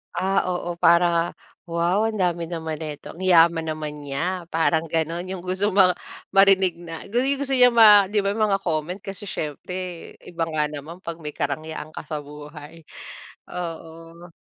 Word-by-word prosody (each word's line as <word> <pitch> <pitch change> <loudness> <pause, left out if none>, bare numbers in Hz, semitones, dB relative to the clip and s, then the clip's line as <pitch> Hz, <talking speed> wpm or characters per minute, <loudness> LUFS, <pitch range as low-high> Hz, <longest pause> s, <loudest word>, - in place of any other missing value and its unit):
Ah, 195 +1 +1
oo, 175 -1 -3
para 170 0 +3 0.4
wow, 170 +5 +1
ang 220 -2 -1
dami 175 -2 0
naman 160 -2 -4
neto, 150 +1 -8
ang 185 - -8
yaman 170 -2 +5
naman 150 -1 -6
niya, 175 +6 -3
parang 160 0 +2
ganun. 165 +2 -1
Yung 190 - -4
gusto 185 +3 -1
ma 185 -2 +5 0.4
marinig 195 -2 +5
na 170 0 -9
gu 240 +5 0
yu - - 0
yung - - -6
gusto 270 - +1
niya 250 -1 +6
ma 210 -4 +7
'di 210 - +2
ba 200 +1 0
yung 220 - +1
mga 195 - +2
comment 170 +1 -2
kasi 195 +2 -8
siyempre 180 +1 -6 0.2
iba 165 -1 -3
nga 150 -1 0
naman 150 +4 -9
'pag 170 -2 -6
may 150 - -4
karangyaan 155 0 -5
ka - - -6
sa 150 -1 -5
buhay, 150 +2 -11 0.6
oo. 165 0 -8
170 Hz, 175 wpm, -23 LUFS, 160-190 Hz, 0.6 s, ma